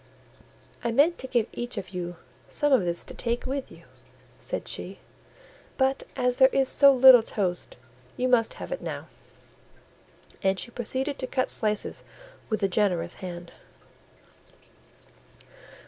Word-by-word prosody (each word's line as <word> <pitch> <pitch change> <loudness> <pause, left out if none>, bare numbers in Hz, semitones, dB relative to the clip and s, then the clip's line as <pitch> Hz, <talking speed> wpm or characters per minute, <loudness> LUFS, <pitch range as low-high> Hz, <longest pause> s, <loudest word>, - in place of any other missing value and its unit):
"I 235 - 0
meant 300 +8 +3
to 260 - -5
give 240 -4 +1
each 240 +1 -5
of 185 - -5
you 175 -1 -5 0.3
some 290 -2 +1
of 255 - +4
this 170 0 -3
to - - -7
take 235 0 -2
with 270 +1 -4
you," - - -15 0.6
said - - -5
she, - - -4 0.8
"but 265 0 +2
as 250 -1 0
there 260 - +8
is 270 0 +1
so 280 -1 +7
little 260 -2 +8
toast, 185 -5 -3 0.4
you 255 - +1
must 240 -3 +2
have - - -8
it - - -3
now," - - -5 1.4
and 190 0 +1
she 235 - -5
proceeded 260 +4 -3
to 255 - -3
cut 255 0 -1
slices 210 -2 -2 0.5
with 215 -2 -1
a - - +4
generous 180 -3 0
hand. 175 -2 -7
240 Hz, 145 wpm, -26 LUFS, 195-265 Hz, 1.4 s, there